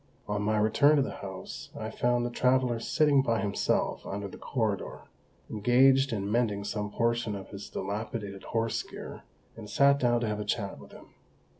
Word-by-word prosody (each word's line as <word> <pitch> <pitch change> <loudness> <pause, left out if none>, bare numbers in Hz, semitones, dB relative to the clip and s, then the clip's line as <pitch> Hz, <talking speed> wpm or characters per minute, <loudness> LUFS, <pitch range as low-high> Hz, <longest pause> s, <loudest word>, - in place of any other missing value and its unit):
On 105 0 -1
my 110 +1 +1
return 125 +8 +4
to 140 - +3
the - - -5
house 95 -2 -7
I - - -4
found 120 0 +1
the 120 - -3
traveller 125 -1 +2
sitting 145 +3 +3
by 115 -4 0
himself 100 -1 0
under 100 +1 -4
the - - -10
corridor, 110 -7 -2 0.5
engaged 130 +5 +4
in 100 -2 -2
mending 110 -4 +1
some 105 0 -3
portion 115 0 0
of 95 -1 -8
his 100 0 -8
dilapidated 100 0 -5
horse 115 0 -1
gear, - - -9 0.3
and 110 -2 -9
sat 140 0 +4
down 120 -2 +2
to 115 - 0
have 105 0 -2
a - - -2
chat 100 -2 -3
with - - -14
him. - - -14
115 Hz, 180 wpm, -29 LUFS, 105-125 Hz, 0.5 s, return